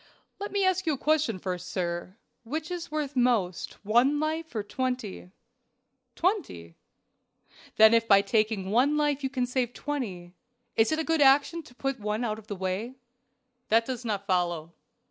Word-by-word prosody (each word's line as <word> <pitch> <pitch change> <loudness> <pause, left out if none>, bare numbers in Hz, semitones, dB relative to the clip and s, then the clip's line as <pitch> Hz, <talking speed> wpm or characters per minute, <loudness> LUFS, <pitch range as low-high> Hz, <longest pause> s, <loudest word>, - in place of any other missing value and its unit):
"Let 405 - -5
me 400 -1 +1
ask 370 -1 +1
you 315 - +3
a - - -3
question 300 -8 +1
first, 180 -1 -5
sir. 175 +1 -3 0.3
Which 310 +8 -4
is 345 -1 -4
worth 300 -2 -3
most, 230 -8 +1
one 245 +7 +3
life 315 -2 -3
or 215 - -1
twenty?" 250 -5 -4 0.9
"Twenty." 320 - -2 1.0
"Then 220 +1 +7
if 230 0 +3
by 200 -2 +6
taking 215 -2 0
one 270 +7 +3
life 295 -2 +1
you 265 - 0
can 255 -2 -1
save 245 -1 -2
twenty, 195 -12 -4 0.4
it 225 +5 +3
is 315 - +1
a 320 - 0
good 325 -1 +1
action 285 +4 +4
to 245 -5 -17
put 270 +1 -2
that 215 - -15
one 210 +3 -1
out 215 -2 -2
of 215 - -16
the 205 - -4
way?" 190 +7 -3 0.7
"That 225 +1 +4
does 255 -1 -4
not 205 -4 -2
follow." 175 -4 -1
240 Hz, 175 wpm, -28 LUFS, 200-290 Hz, 1.0 s, Then